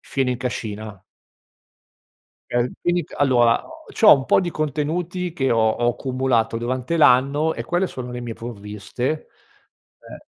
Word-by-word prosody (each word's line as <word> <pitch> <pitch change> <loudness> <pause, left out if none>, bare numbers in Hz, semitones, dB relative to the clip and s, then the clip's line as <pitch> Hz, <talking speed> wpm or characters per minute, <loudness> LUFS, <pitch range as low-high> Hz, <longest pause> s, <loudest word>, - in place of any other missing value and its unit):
fieno 135 -2 -2
in 125 - -1
cascina 110 -5 -5 1.5
eh, 120 0 +1
quindi 175 -2 0
c - - -17
allora 120 -4 +3
o 320 0 -14
c'ho 220 - +8
un 135 -2 0
po' - - +4
di 175 -2 -3
contenuti 160 +4 -2
che 135 -5 0
ho 115 - +2
ho 120 +2 0
accumulato 130 -3 0
durante 130 +7 -2
l'anno 145 +3 +4
e - - -5
quelle 175 +2 0
sono 125 -1 -7
le 125 - -5
mie 120 -2 -5
provviste, 115 +6 -5 0.7
ehm - - -13
130 Hz, 150 wpm, -22 LUFS, 120-155 Hz, 1.5 s, c'ho